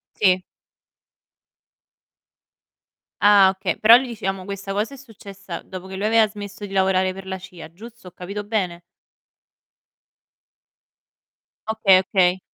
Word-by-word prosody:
Sì. 185 -3 +3 2.8
Ah, 205 -2 +6
okay, 190 0 -3
però 225 +2 +8
lì, 260 +1 0
diciamo, 195 -5 -4
questa 195 0 -6
cosa 210 +7 -2
è - - -10
successa 200 -6 -10
dopo 190 -1 -10
che 190 - -7
lui 205 +2 -2
aveva 220 -1 +4
smesso 205 0 -9
di 200 - -8
lavorare 190 -1 +1
per 190 0 -11
la 190 - -4
CIA, 180 -3 -12
giusto? 230 +3 -14
Ho 180 - -15
capito 200 +3 -7
bene? 185 -5 -3 2.9
Okay. 215 -4 +4
Okay. 185 -1 +1
195 Hz, 125 wpm, -22 LUFS, 185-210 Hz, 2.9 s, però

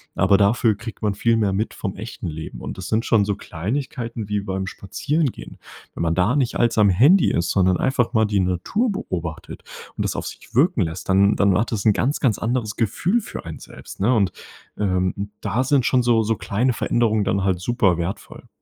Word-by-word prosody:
Aber 95 +1 +4
dafür 105 +2 +3
kriegt 115 +1 -9
man 105 -1 +1
viel 115 +3 +1
mehr 105 -3 +1
mit 105 +4 -2
vom 95 -3 -4
echten 110 0 -7
Leben. 80 -1 -7
Und - - -6
das 95 - -6
sind 115 +3 0
schon 105 -3 +3
so 100 0 -1
Kleinigkeiten 115 - -4
wie 105 0 0
beim 95 -1 -3
Spazierengehen. 145 - -3 0.4
Wenn - - -6
man 85 0 +1
da 95 +8 +2
nicht 130 -4 0
als 120 -1 +1
am 105 -1 +5
Handy 140 - +5
ist, 85 0 0
sondern 95 -2 +3
einfach 130 -2 0
mal 110 -2 +3
die 105 -1 0
Natur 95 - 0
beobachtet 85 - -5 0.4
und - - -1
das - - -2
auf - - -4
sich 115 - -10
wirken 150 - +3
lässt, 85 +2 -4
dann 100 +2 +4
dann 100 -2 +3
hat 115 - -1
das 100 -3 -3
'n 110 - +6
ganz, 135 +8 0
ganz 120 -7 +2
anderes 115 -2 -2
Gefühl 165 - +1
für - - -8
einen - - -7
selbst, - - -12
ne? 115 +6 +3
Und, 100 -4 +2 0.5
ähm, 95 0 -1
da 125 +5 0
sind 135 -2 +2
schon 130 - +3
so 120 -2 +3
so 110 +1 0
kleine 105 +7 0
Veränderungen 110 -2 +1
dann 100 -1 0
halt 95 -2 +1
super 100 -3 +1
wertvoll. 85 +3 -6
105 Hz, 210 wpm, -22 LUFS, 95-120 Hz, 0.5 s, n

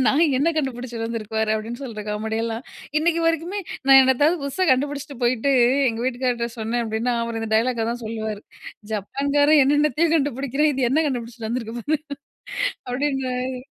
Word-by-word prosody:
நாய் 315 +4 +4
என்ன 295 +5 +2
கண்டுபிடிச்சிட்டு 245 -5 -3
வந்திருக்கு 225 -1 -5
பாரு? 220 0 +1
அப்பிடின்னு 230 +5 -5
சொல்ற 215 -4 -6
காமெடியெல்லாம், 225 +2 -2 0.4
இன்னக்கி 335 +1 +1
வரைக்குமே 330 +5 0 0.3
நான் 270 0 +9
என்னதாவது 290 +6 +3
புதுசா 280 +7 -1
கண்டுபிடிச்சிட்டு 280 +1 -2
போயிட்டு 245 +2 +1 0.4
எங்க 225 -1 -3
வீட்டுக்காரர்ட்ட 245 -2 -1
சொன்னேன் 230 +2 -1
அப்டீன்னா, 225 +3 -1
அவரு 230 -1 -3
இந்த 225 - -4
டயலாக்க 230 0 +1
தான் 240 0 -5
சொல்லுவாரு. 220 -2 -4 0.5
ஜப்பான்காரன் 285 +8 +2
என்னென்னத்தையோ 295 +3 +2
கண்டுபிடிக்கிறான், 280 +1 +1
இது 255 -2 +1
என்ன 315 +4 +3
கண்டுபிடிச்சிட்டு 235 -3 -5
வந்துருக்கு 235 -1 -3
பாரு! 300 +5 -1 0.9
அப்டின்னுவாரு. 255 -1 -2
250 Hz, 145 wpm, -23 LUFS, 230-285 Hz, 0.9 s, நான்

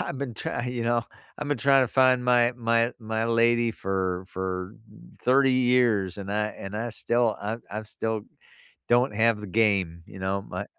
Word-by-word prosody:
I've 135 - -4
been 130 -4 -4
try 120 +2 -4
you 125 -1 -3
know, 120 0 +1 0.4
I've 150 - -4
been 145 - +1
trying 135 +1 +4
to - - -5
find 130 0 +3
my 120 -1 +4
my 115 0 +1
my 110 0 -2
lady 115 0 +3
for 95 -3 -2
for 95 +2 -4 0.5
30 135 +1 +4
years 120 -7 +2
and 100 0 -6
I 105 +1 0
and 100 -1 -8
I 115 +2 -3
still 120 0 0
I 105 +2 -3
I 105 +2 -4
still 110 0 -3 0.7
don't 120 -1 +3
have 115 0 +2
the 105 - -7
game, 95 -5 +1
you 95 - -12
know, 95 +1 -1
my - - -6
115 Hz, 185 wpm, -26 LUFS, 100-120 Hz, 0.7 s, trying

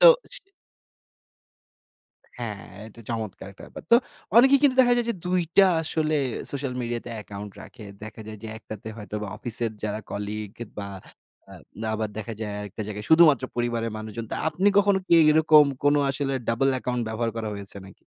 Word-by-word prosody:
তো। - - +9 0.3
সে 445 -5 -5 1.9
হ্যাঁ, 110 -5 -6 0.2
এটা 115 +1 -14
চমৎকার 110 -5 -4
একটা 100 - -15
ব্যাপার। - - -10
তো - - +11 0.4
অনেকেই 270 +3 +8
কিন্তু 270 -3 +4
দেখা 245 -1 +5
যায় 240 -1 0
যে - - -1
২ 180 0 +2 0.2
টা 195 - +8 0.2
আসলে 155 -1 0 0.4
সোশ্যাল 135 -2 -3
মিডিয়াতে 120 0 -4
অ্যাকাউন্ট 105 -1 -7
রাখে। 120 -4 -12 0.2
দেখা 110 0 -8
যায় 110 -1 -8
যে 110 - -6
একটাতে 110 -1 -9
হয়তোবা 105 -1 -5
অফিসের 120 -1 +1
যারা 105 0 -2
কলিগ 105 0 -4 0.3
বা, 100 -1 -4 0.6
আ - - -11 0.4
আবার 110 0 -2
দেখা 110 +2 -5
যায় 105 -2 -3
আরেকটা 105 +1 -6
জায়গায় 105 0 -6
শুধুমাত্র 155 -6 +6
পরিবারের 120 -1 -1
মানুষজন। 110 +1 -6
তা - - -2
আপনি 190 +5 +2
কখনো 200 -1 +4
কি - - +4 0.2
এরকম 155 -1 +6 0.2
কোনো 145 0 +5
আসলে 135 0 -2 0.2
double 130 +4 +2
account 125 -1 -2
ব্যবহার 115 +1 -1
করা 110 -1 -3
হয়েছে 100 0 -7
নাকি? 95 - -17
115 Hz, 170 wpm, -25 LUFS, 105-155 Hz, 1.9 s, তো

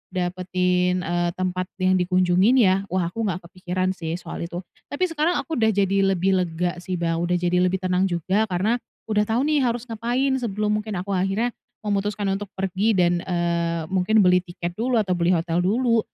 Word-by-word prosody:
dapetin, 180 0 0
eee, 175 +1 0
tempat 185 0 -2
yang 185 -1 +2
dikunjungin 185 +5 +3
ya. 195 -5 +3
Wah, 180 -2 -1
aku 225 +1 -2
gak 185 -2 -3
kepikiran 185 0 -2
sih 165 -3 -4
soal 170 -1 -6
itu. 175 +2 -6 0.2
Tapi 285 - -3
sekarang 330 +3 +1
aku 320 -7 -3
udah 220 - +3
jadi 195 0 +2
lebih 190 +1 +2
lega 175 0 -2
sih 185 +1 -4
Bang, 165 -1 -1
udah 175 +1 0
jadi 175 0 +1
lebih 185 +1 +1
tenang 185 +1 +2
juga 190 +5 0
karena 205 +6 0 0.3
udah 210 0 +3
tau 235 +4 +1
nih 300 -1 +2
harus 240 -1 0
ngapain 240 +5 0
sebelum 210 -2 -1
mungkin 210 -1 -5
aku 200 +2 -5
akhirnya 195 +6 0 0.3
memutuskan 205 0 -1
untuk 200 +1 -3
pergi 195 +3 0
dan, 175 -1 +3
eee, 170 -2 0
mungkin 195 +3 +3
beli 180 0 +5
tiket 175 -1 -6
dulu 245 +1 +1
atau 200 -4 0
beli 175 +1 +2
hotel 165 +1 0
dulu. 230 +5 +2
185 Hz, 185 wpm, -23 LUFS, 180-210 Hz, 0.3 s, beli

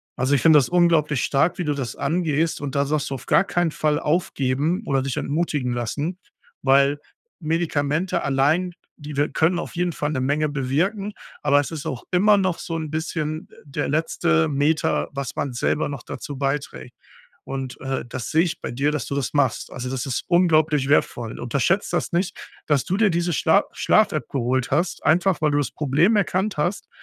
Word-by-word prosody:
Also, 130 +3 +1
ich - - +1
finde 160 -2 +7
das 135 - +3
unglaublich 165 -6 +3
stark, 145 +5 +1
wie 180 - -2
du 150 - +1
das 135 -4 -4
angehst 160 +1 0
und 140 -1 -4
da 140 0 +2
sagst 150 0 -1
du, 135 - -3
„auf 130 - -9
gar - - +4
keinen 175 -4 0
Fall 150 0 0
aufgeben 150 - 0
oder 135 -1 +1
dich 130 -1 -3
entmutigen 145 -5 -1
lassen“, 145 +10 -3 0.4
weil 140 +1 +4 0.4
Medikamente 155 +1 0
allein, 150 +7 +1 0.2
die 150 -1 -8
wir 145 +1 +2
können 170 +3 +2
auf - - -5
jeden 175 -1 0
Fall 150 0 -2
'ne 130 - -1
Menge 150 +3 +1
bewirken, 165 - -1 0.3
aber 145 0 +4
es 145 - -2
ist 160 0 -5
auch 125 -5 -4
immer 205 +3 +5
noch 185 -3 0
so 165 - -5
'n 155 -2 -5
bisschen, 155 -1 -3
äh, - - -18
der 145 +1 -3
letzte 140 - +1
Meter, 150 +2 +1
was 140 -3 -5
man 135 - -2
selber 130 +5 0
noch 140 - -6
dazu 145 -2 -7
beiträgt. 140 +1 -3 0.5
Und, 135 -2 -5
äh, 135 -2 -2
das 130 -3 -5
sehe 160 +2 +4
ich 170 - -4
bei - - -4
dir, 140 +5 0
dass 150 -6 -2
du - - -4
das 140 0 -2
machst. 135 -5 +1
Also, 125 0 -5
das 130 0 -3
ist 130 - -2
unglaublich 155 -5 +3
wertvoll. 120 -5 +1
Unterschätze 140 - 0
das 175 - -1
nicht, 175 +1 -1 0.3
dass 145 -4 +1
du 190 - 0
dir 210 -2 +3
diese 170 0 0
Schla - - +3
Schlaf-App - - +2
geholt 130 -1 0
hast, 170 +6 0
einfach, 175 +2 +2
weil 150 - +3
du 145 - +2
das 145 - -1
Problem 155 - +2
erkannt 190 +1 0
hast 175 +7 -2
150 Hz, 195 wpm, -23 LUFS, 135-170 Hz, 0.5 s, finde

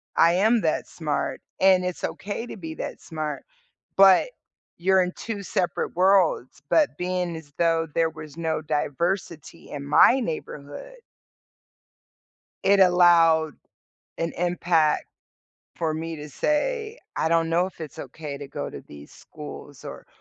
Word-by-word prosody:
I 170 +1 +5
am 220 +4 +3
that 160 - 0
smart, 155 -3 -3 0.2
and 185 -1 +5
it's 180 - -4
okay 205 +4 -4
to - - -8
be 160 -3 -7
that - - -6
smart. 155 -2 -5 0.5
But 195 - +7 0.5
you're 190 +1 +4
in 180 0 -2
2 210 -3 -5
separate 180 -2 -2
worlds, 180 -9 +2
but 305 -2 +3
being 180 -1 -2
as 145 -3 -12
though 165 -1 +2
there 165 -1 +2
was 155 -1 -11
no 160 -2 -1
diversity 165 +2 -3
in 140 -1 -6
my 235 - +5
neighborhood 160 - -6 1.7
it 195 0 +5
allowed 170 -4 +5 0.7
an 165 0 -1
impact 170 -3 +1 0.7
for 160 -2 -1
me 165 +1 -4
to 150 0 -8
say, 440 - -1 0.2
"I 160 - +1
don't 165 -1 +2
know 170 +2 +2
if 185 -3 -9
it's 150 -5 -8
okay 140 +1 -7
to 140 0 -8
go 135 - -5
to - - -9
these 70 0 -13
schools - - -11
or - - -9
170 Hz, 145 wpm, -25 LUFS, 155-190 Hz, 1.7 s, But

